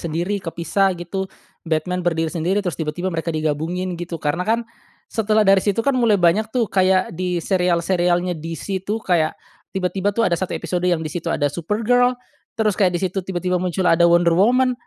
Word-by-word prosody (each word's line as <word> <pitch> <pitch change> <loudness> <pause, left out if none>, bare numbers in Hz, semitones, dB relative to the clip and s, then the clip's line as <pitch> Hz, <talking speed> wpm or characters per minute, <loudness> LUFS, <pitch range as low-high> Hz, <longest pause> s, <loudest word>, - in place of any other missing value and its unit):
sendiri 170 +5 -2
kepisah 185 +3 0
gitu. 190 +3 -4 0.4
Batman 165 +3 -1
berdiri 165 -2 0
sendiri 180 +5 0
terus 175 -7 -3
tiba-tiba 165 +4 -2
mereka 165 +1 -3
digabungin 165 +4 -2
gitu, 175 -1 -5
karena, 150 +4 0
kan, 230 +2 +2 0.5
setelah 215 -1 +2
dari 195 -1 +5
situ, 205 +2 0
kan, 280 - +3
mulai 230 -4 +4
banyak, 190 +5 +3
tuh, 240 -1 +1
kayak 185 -2 +2
di 180 0 -1
serial-serialnya 180 -1 +1
DC, 165 +4 -4
tuh, 210 +3 -2
kayak 165 -5 +1 0.4
tiba-tiba, 190 +1 0
tuh, 230 +1 +2
ada 170 - +2
satu 185 - -3
episode 175 +2 -2
yang 170 -2 +1
di 155 - -4
situ 175 - -4
ada 145 - +1
Supergirl, 230 +9 +1 0.4
terus 215 -2 +2
kayak 180 -2 +2
di - - -4
situ 190 +1 -1
tiba-tiba 180 -1 -2
muncul 180 0 -1
ada 170 0 +5
Wonder 170 0 +4
Woman, 250 +8 +3
180 Hz, 180 wpm, -21 LUFS, 170-195 Hz, 0.5 s, dari